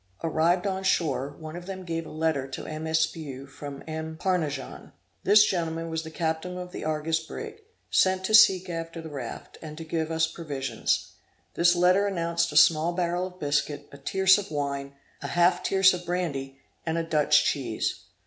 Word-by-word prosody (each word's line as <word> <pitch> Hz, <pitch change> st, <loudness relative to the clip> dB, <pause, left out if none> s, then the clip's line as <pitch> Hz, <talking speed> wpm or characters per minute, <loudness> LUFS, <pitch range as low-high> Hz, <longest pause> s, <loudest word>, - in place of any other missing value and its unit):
Arrived 165 Hz, +3 st, +2 dB
on 190 Hz, -1 st, -1 dB
shore, 145 Hz, -7 st, 0 dB
one 155 Hz, 0 st, -8 dB
of 175 Hz, +1 st, -8 dB
them 190 Hz, -1 st, -6 dB
gave 165 Hz, -1 st, -3 dB
a -, -, -10 dB
letter 155 Hz, -4 st, 0 dB
to 130 Hz, -, -7 dB
M. 155 Hz, +1 st, -5 dB
Espiau 160 Hz, -4 st, -1 dB
from 140 Hz, 0 st, -9 dB
M. 160 Hz, 0 st, -5 dB
Parnajon. 155 Hz, -8 st, -2 dB, 0.3 s
This 210 Hz, +1 st, +7 dB
gentleman 165 Hz, -2 st, -2 dB
was 160 Hz, 0 st, -1 dB
the 160 Hz, -, -8 dB
captain 160 Hz, +2 st, -2 dB
of 180 Hz, 0 st, -7 dB
the -, -, -6 dB
Argus 155 Hz, +1 st, 0 dB
brig, 430 Hz, -, -8 dB, 0.3 s
sent 185 Hz, 0 st, +3 dB
to 215 Hz, -, -2 dB
seek 190 Hz, -4 st, +7 dB
after 165 Hz, -1 st, -5 dB
the 160 Hz, -1 st, -8 dB
raft, 130 Hz, -5 st, -7 dB
and 155 Hz, -1 st, -8 dB
to 165 Hz, -, -6 dB
give 160 Hz, 0 st, -2 dB
us 160 Hz, 0 st, +2 dB
provisions. 150 Hz, -5 st, -2 dB, 0.4 s
This 175 Hz, +1 st, +4 dB
letter 180 Hz, +3 st, +4 dB
announced 170 Hz, -3 st, 0 dB
a 150 Hz, -, 0 dB
small 160 Hz, +2 st, +5 dB
barrel 175 Hz, +1 st, -1 dB
of 185 Hz, 0 st, -14 dB
biscuit, 145 Hz, 0 st, -1 dB
a 140 Hz, -, -12 dB
tierce 190 Hz, +6 st, +4 dB
of 205 Hz, -, -7 dB
wine, 140 Hz, -2 st, -3 dB, 0.3 s
a 140 Hz, -, -4 dB
half 175 Hz, +4 st, +3 dB
tierce 190 Hz, 0 st, +4 dB
of 180 Hz, -1 st, -5 dB
brandy, 150 Hz, -7 st, -3 dB, 0.3 s
and 160 Hz, 0 st, -1 dB
a 165 Hz, -, 0 dB
Dutch 150 Hz, -2 st, +3 dB
cheese. 120 Hz, -6 st, -2 dB
165 Hz, 185 wpm, -27 LUFS, 150-180 Hz, 0.4 s, This